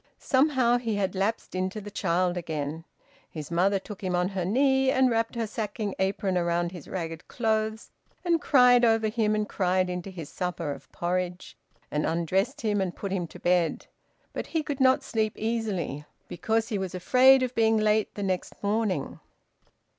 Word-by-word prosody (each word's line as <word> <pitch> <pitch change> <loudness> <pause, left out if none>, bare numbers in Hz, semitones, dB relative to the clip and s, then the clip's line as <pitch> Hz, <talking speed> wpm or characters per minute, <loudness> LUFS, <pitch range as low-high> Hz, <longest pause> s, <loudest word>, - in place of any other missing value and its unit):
Somehow 260 -3 +2
he 225 -3 -2
had 195 -2 -1
lapsed 200 +4 -2
into 185 +3 -2
the 205 0 -9
child 180 -2 0
again. 160 -2 -4 0.4
His 155 0 -8
mother 190 +4 +3
took 200 +1 -9
him 185 -1 0
on 180 +1 +1
her 190 -2 -3
knee, 265 +5 +3
and 260 -1 +3
wrapped 230 +1 0
her 230 -1 -1
sacking 210 -1 -4
apron 190 0 0
round 170 0 0
his 175 -5 -10
ragged 165 -2 -5
clothes, 220 -1 -1 0.3
and 335 -2 +2
cried 250 -3 +5
over 225 -2 +3
him 215 -1 +1
and 210 0 -1
cried 185 -1 0
into 180 +1 -5
his 170 -5 -8
supper 175 -4 -3
of - - -10
porridge, 180 +1 -3 0.4
and 150 0 0
undressed 185 - 0
him 210 -3 +1
and 185 -2 -2
put 200 - -5
him 180 -3 -1
to - - -13
bed. 175 -2 +1 0.5
But - - -4
he 320 -2 -1
could 285 -2 -4
not 265 +1 +4
sleep 220 -5 -1
easily 210 -10 -2 0.2
because 225 +5 -1
he 210 -4 -1
was 190 -1 -4
afraid 255 +7 +5
of 250 -1 -2
being 225 -1 +3
late 215 0 +1
the 205 - -4
next 185 0 -3
morning. 205 -6 -1
200 Hz, 175 wpm, -27 LUFS, 180-225 Hz, 0.5 s, cried